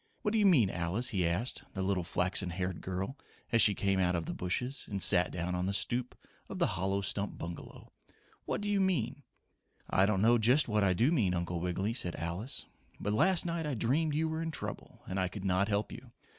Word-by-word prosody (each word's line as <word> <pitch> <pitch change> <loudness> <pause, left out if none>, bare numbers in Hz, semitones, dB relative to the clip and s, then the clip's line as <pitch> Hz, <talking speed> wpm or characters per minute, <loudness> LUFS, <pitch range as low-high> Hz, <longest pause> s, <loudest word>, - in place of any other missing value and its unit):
What 210 - +1
do 225 - +2
you 205 - +5
mean, 125 - +5
Alice?" 90 +8 -1
he 95 -5 +1
asked 95 +9 -2
the 95 - -1
little 95 -2 0
flaxen 90 +2 0
haired 90 0 -3
girl 95 +9 -4 0.3
as 115 -1 +4
she 105 -2 +5
came 100 -1 +1
out 90 -1 +2
of 85 -1 -2
the - - -4
bushes 125 +10 -2
and 100 - -3
sat 90 -1 +5
down 90 +1 -3
on 90 +1 -1
the 100 - -1
stoop 125 +3 -1 0.3
of - - -6
the - - +3
hollow 95 +2 -1
stump 100 +1 -2
bungalow. 85 0 -8 0.5
"What - - -2
do 205 - -3
you 205 -1 +2
mean?" 145 -8 0 0.7
"I 95 +1 +3
don't 100 -1 +1
know 120 +1 +5
just 125 +7 +4
what 105 -2 +1
I 95 -2 +3
do 120 - +2
mean, 105 - +2
Uncle 85 0 -2
Wiggily," 90 +5 -1
said 90 -8 -1
Alice. 85 - -3 0.3
"But 105 - -1
last 180 - +3
night 165 -2 -2
I 145 - -2
dreamed 145 +7 +1
you 160 +1 +1
were 160 0 -3
in 165 - -2
trouble 160 - -7
and 95 +1 -3
I 95 - +1
could 95 +1 -7
not 95 +1 +2
help 105 0 -1
you. 125 0 -10
100 Hz, 225 wpm, -32 LUFS, 90-130 Hz, 0.7 s, you